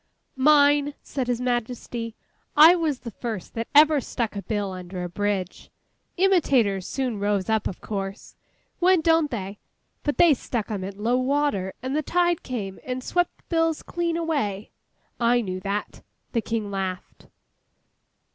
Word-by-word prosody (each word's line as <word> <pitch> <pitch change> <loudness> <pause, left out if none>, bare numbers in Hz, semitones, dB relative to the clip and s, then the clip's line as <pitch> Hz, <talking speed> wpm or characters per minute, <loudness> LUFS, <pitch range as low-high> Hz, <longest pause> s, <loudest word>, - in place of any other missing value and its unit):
'Mine!' 290 +1 +4
said 260 -3 -3
His 245 -1 0
Majesty. 240 -2 -3 0.4
'I 320 +4 +9
was 310 -6 -1
the 235 - -7
first 220 -5 -6
that 230 0 -3
ever 300 -1 +7
stuck 230 -3 -3
a 200 - -3
bill 205 -2 -2
under 180 0 -6
a - - -2
bridge! 195 0 -3 0.5
Imitators 270 - +3
soon 255 -6 -2
rose 205 0 0
up, 220 -1 +1
of 185 - -7
course.—When 215 - -2
don't 325 -1 +3
they? 200 -4 -5 0.4
But 290 - -2
they 345 -3 +7
stuck 230 -4 -3
'em 200 -3 -3
at 195 +1 -6
low 235 +4 +1
water, 255 -8 0
and 260 +2 -2
the 305 - +2
tide 345 +2 +1
came 205 -7 -5
and 255 0 -4
swept 355 +4 0
the - - -31
bills 330 -2 +1
clean 340 -1 -2
away. 275 -12 -2 0.5
I 240 +1 +3
knew 185 -4 -4
that!' 200 +2 -4 0.3
The 230 - 0
King 220 -2 -3
laughed. 190 -2 -5
240 Hz, 155 wpm, -25 LUFS, 200-295 Hz, 0.5 s, I